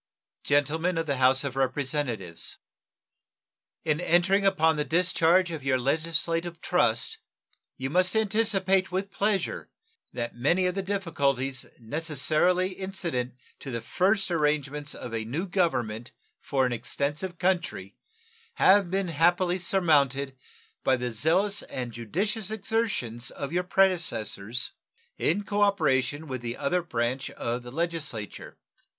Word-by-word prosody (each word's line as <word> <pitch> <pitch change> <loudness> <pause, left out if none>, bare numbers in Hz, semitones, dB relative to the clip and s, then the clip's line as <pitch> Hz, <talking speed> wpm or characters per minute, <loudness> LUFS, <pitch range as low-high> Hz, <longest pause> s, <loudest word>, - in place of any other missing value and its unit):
Gentlemen 160 +5 +1
of 165 - 0
the 140 -3 -1
House 130 +1 +4
of 140 -2 -4
Representatives: 130 - -2 1.3
In 155 -1 +1
entering 190 +3 +3
upon 160 -4 +3
the 150 - 0
discharge 175 +2 +3
of 155 -4 -5
your 135 -1 +2
legislative 165 +4 0
trust - - +1 0.6
you 135 +1 -3
must 185 +3 +2
anticipate 195 -3 +2
with 190 +2 -2
pleasure 200 0 -1 0.4
that 120 -1 -4
many 165 +10 +2
of 180 - +1
the 195 - -2
difficulties 140 -9 -1
necessarily 160 +7 +1
incident 175 -10 -3 0.2
to 135 - -7
the 120 -2 -2
first 190 - +1
arrangements 150 -2 0
of 120 - -7
a 115 -1 -1
new 145 - -3
government 125 - -1 0.3
for 135 -2 0
an 125 - 0
extensive 150 +9 -3
country 170 - -1 0.6
have 195 -1 +5
been 190 0 -1
happily 175 +3 +2
surmounted 140 -7 +2 0.5
by 130 - +4
the 125 -1 -3
zealous 175 - +2
and 125 -2 -5
judicious 190 - -2
exertions 205 - -2
of 140 +2 -6
your 180 - +2
predecessors 125 - 0 0.5
in 195 +6 +1
cooperation 160 -9 +1
with 130 -3 -4
the 120 0 -4
other 180 +5 0
branch 125 -5 -2
of 120 +1 -3
the 120 - -9
Legislature. 155 - -4
160 Hz, 125 wpm, -27 LUFS, 130-185 Hz, 1.3 s, have